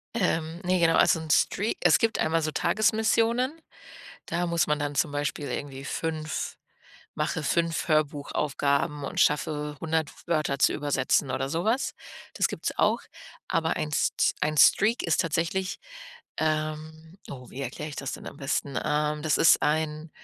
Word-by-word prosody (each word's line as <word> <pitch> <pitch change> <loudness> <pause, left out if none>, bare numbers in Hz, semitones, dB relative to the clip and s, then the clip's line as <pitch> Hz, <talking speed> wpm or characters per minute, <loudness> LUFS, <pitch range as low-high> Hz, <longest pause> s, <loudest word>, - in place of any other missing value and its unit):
Ähm, 165 -5 -1
ne, 180 0 +1
genau, 165 -1 +4
also - - +4
'n 160 -1 -8
Strea 200 +8 +2
es - - +5
gibt 225 -1 +1
einmal 165 +1 +1
so 155 0 -1
Tagesmissionen. 225 - +1 0.7
Da 175 +1 -1
muss 170 -1 +1
man 150 0 +1
dann 145 0 -3
zum 145 +1 +1
Beispiel 145 0 -3
irgendwie 135 -1 -5
5 155 0 -3 0.6
mache 160 - -2
5 165 +2 0
Hörbuchaufgaben 145 -1 0
und - - -4
schaffe 150 0 +1
100 160 -1 -1 0.2
Wörter 155 -4 0
zu 140 - +3
übersetzen 145 -1 +1
oder 135 +1 -2
so 165 +4 -2
was. 240 +5 +1 0.4
Das - - +2
gibt's - - -4
auch, - - +2 0.5
aber 160 0 0
ein 155 - -2
S 150 - +2
St - - +2
ein 150 0 0
Streak 220 - +5
ist 170 +1 +2
tatsächlich, 170 +4 -1 0.6
ähm 155 +2 -3
oh, 130 -2 -9
wie 135 - -7
erkläre 140 +4 -5
ich 145 - -8
das 135 - -4
denn - - -8
am - - -10
besten? 140 0 -2
Ähm, 150 0 0
das 155 -1 +1
ist 165 - +5
ein 155 +1 -1
155 Hz, 165 wpm, -27 LUFS, 145-170 Hz, 0.7 s, es